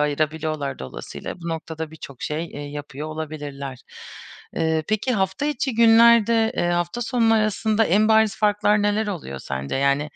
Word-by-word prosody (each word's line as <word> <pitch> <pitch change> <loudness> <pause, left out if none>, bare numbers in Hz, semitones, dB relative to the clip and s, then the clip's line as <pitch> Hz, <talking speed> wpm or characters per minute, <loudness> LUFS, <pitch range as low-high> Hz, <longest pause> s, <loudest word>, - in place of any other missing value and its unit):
ayırabiliyorlar 150 -1 -1
dolayısıyla. 65 - -7
Bu 170 - -6
noktada 160 -1 -5
birçok 140 -5 -11
şey, 155 +2 -2
eee, 145 - -9
yapıyor 145 0 -6
olabilirler. 145 -4 -6 0.8
Eee, 160 -1 +1
peki, 215 +4 0
hafta 190 +8 -1
içi 275 -3 -1
günlerde, 230 0 +5
eee, 175 - +1
hafta 175 +6 -1
sonu 225 -1 +2
arasında 215 0 +2
en 210 +4 +3
bariz 220 -1 +4
farklar 210 0 +2
neler 205 +1 +1
oluyor 170 - -5
sence? 70 - -4
Yani, 140 +1 +2
175 Hz, 150 wpm, -23 LUFS, 150-220 Hz, 0.8 s, günlerde